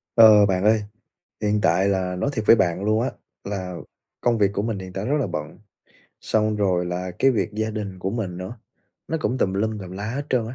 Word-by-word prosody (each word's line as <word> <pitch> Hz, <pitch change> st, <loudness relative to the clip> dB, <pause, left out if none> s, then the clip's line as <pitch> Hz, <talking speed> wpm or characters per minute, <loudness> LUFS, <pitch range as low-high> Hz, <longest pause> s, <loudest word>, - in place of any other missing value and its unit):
Ờ, 110 Hz, -3 st, +8 dB
bạn 95 Hz, -1 st, 0 dB
ơi, 110 Hz, 0 st, +4 dB, 0.6 s
hiện 105 Hz, 0 st, +1 dB
tại 95 Hz, +1 st, +3 dB
là 95 Hz, -2 st, 0 dB
nói 90 Hz, -, -1 dB
thiệt 110 Hz, -4 st, -3 dB
với -, -, +9 dB
bạn 90 Hz, -2 st, 0 dB
luôn 110 Hz, +2 st, +2 dB
á, 125 Hz, -, -1 dB, 0.3 s
là 95 Hz, -3 st, -4 dB, 0.5 s
công 120 Hz, -1 st, +2 dB
việc 105 Hz, -2 st, +4 dB
của 100 Hz, -, -1 dB
mình 110 Hz, -2 st, -2 dB
hiện 95 Hz, -1 st, -9 dB
tại 95 Hz, +2 st, -4 dB
rất 145 Hz, +5 st, +1 dB
là 135 Hz, -, 0 dB
bận, 75 Hz, +4 st, -6 dB, 0.6 s
xong 110 Hz, 0 st, +1 dB
rồi 95 Hz, -4 st, +1 dB
là 90 Hz, +1 st, -3 dB
cái 135 Hz, -, +5 dB
việc 105 Hz, -3 st, -1 dB
gia 110 Hz, +1 st, -2 dB
đình 105 Hz, -4 st, -5 dB
của 95 Hz, +1 st, -2 dB
mình 100 Hz, -5 st, -3 dB
nữa, 95 Hz, +6 st, -7 dB, 0.5 s
nó 160 Hz, -, -1 dB
cũng 130 Hz, -4 st, -1 dB
tùm 95 Hz, -, +1 dB
lum 110 Hz, +2 st, -1 dB
tùm 95 Hz, -3 st, -8 dB
la 95 Hz, +2 st, -6 dB
hết 140 Hz, +4 st, -4 dB
trơn 120 Hz, -4 st, +1 dB
á. 120 Hz, -, -7 dB
105 Hz, 235 wpm, -23 LUFS, 95-110 Hz, 0.6 s, với